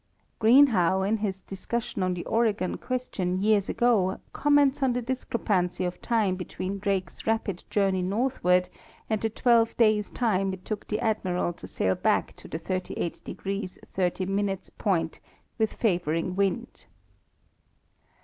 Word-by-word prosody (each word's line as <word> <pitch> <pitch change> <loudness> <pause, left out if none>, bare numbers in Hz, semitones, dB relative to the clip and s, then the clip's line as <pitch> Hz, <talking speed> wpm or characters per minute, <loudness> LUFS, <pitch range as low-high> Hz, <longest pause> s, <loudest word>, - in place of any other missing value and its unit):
Greenhow, 220 -7 +5
in 210 +3 +1
his 195 -3 -3
discussion 200 +2 -4
on 185 -1 +1
the 175 - -5
Oregon 220 -5 +1
question 205 -8 -2
years 205 -1 +2
ago, 210 -6 +2
comments 290 -1 +3
on 260 -2 +3
the 245 - -1
discrepancy 215 -8 -1
of 180 0 -4
time 215 -6 +1
between 185 +1 -5
Drake's 195 -3 -2
rapid 220 -5 -1
journey 195 -2 +1
northward 180 -3 +1 0.4
and 215 - +1
the 225 - +1
twelve 230 0 +3
days' 215 -3 +3
time 195 -5 0
it 185 -1 -9
took 215 -2 -4
the 210 - -1
Admiral 185 -5 0
to - - -11
sail 95 - +1
back - - 0
to - - -12
the - - -4
388° 185 +2 -4 0.2
30' 195 +2 0 0.2
point 165 -6 0 0.4
with 220 -1 +1
favoring 175 -4 0
wind. 200 +5 -2
200 Hz, 135 wpm, -27 LUFS, 185-225 Hz, 0.4 s, Greenhow